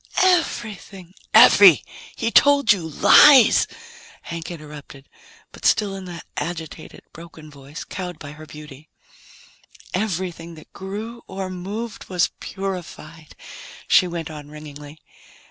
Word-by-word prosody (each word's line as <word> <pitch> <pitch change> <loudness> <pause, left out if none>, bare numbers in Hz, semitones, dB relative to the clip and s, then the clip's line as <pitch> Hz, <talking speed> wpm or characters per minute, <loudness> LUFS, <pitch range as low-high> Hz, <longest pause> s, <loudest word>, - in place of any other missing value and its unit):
Everything 215 - -2
" - - -38
"Effie, 195 - +6 0.3
he 230 0 -3
told 285 -3 +5
you 170 -5 -6
lies!" 255 - +6 0.6
Hank 165 -1 -7
interrupted, 150 -4 -12 0.4
but - - -16
still 205 -2 +1
in 190 -1 -9
that 175 -2 -10
same 145 - -3
agitated, 160 -2 -10
broken 160 -2 -13
voice, 140 +2 -11
cowed 180 -3 -7
by 145 -1 -10
her 155 +1 -13
beauty. 150 0 -13 1.0
"Everything 180 -4 -4
that 155 - -17
grew 215 +5 -8
or 190 -1 -6
moved 205 +5 -7
was 180 -2 0
purified," 175 -5 -8 0.5
she 185 - +4
went 170 -2 -6
on 150 -1 -11
ringingly. 150 0 -12
175 Hz, 125 wpm, -21 LUFS, 155-195 Hz, 1.0 s, Effie